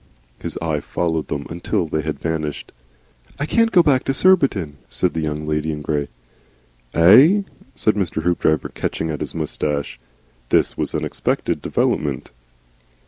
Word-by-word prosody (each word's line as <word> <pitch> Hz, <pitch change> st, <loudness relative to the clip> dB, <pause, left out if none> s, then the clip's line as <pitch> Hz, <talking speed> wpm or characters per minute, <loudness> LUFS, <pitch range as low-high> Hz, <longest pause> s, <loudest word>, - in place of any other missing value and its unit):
His -, -, -4 dB
eye 80 Hz, -2 st, 0 dB
followed 80 Hz, +1 st, -2 dB
them 70 Hz, -1 st, -4 dB
until 85 Hz, +1 st, -1 dB
they 80 Hz, -1 st, -2 dB
had 75 Hz, 0 st, -3 dB
vanished. 80 Hz, -3 st, -3 dB, 0.7 s
"I 145 Hz, -, 0 dB
can't 230 Hz, +7 st, +2 dB
go 180 Hz, -5 st, +6 dB
back 135 Hz, -5 st, +3 dB
to 135 Hz, -, 0 dB
Surbiton," 130 Hz, -, +3 dB
said 90 Hz, -, 0 dB
the 80 Hz, -, -2 dB
Young 75 Hz, 0 st, -3 dB
Lady 75 Hz, +1 st, -1 dB
in 75 Hz, -1 st, -5 dB
Grey. 75 Hz, -1 st, -1 dB, 0.9 s
"EIGH?" 130 Hz, -, +7 dB, 0.3 s
said 110 Hz, -, +2 dB
Mr. 90 Hz, -5 st, -2 dB
Hoopdriver, 80 Hz, -3 st, +1 dB
catching 80 Hz, 0 st, -3 dB
at 75 Hz, -, -4 dB
his -, -, -5 dB
moustache. 70 Hz, -4 st, -3 dB, 0.5 s
This -, -, +2 dB
was -, -, -3 dB
an -, -, 0 dB
unexpected -, -, -2 dB
development. 70 Hz, -5 st, -1 dB
80 Hz, 150 wpm, -21 LUFS, 75-110 Hz, 0.9 s, EIGH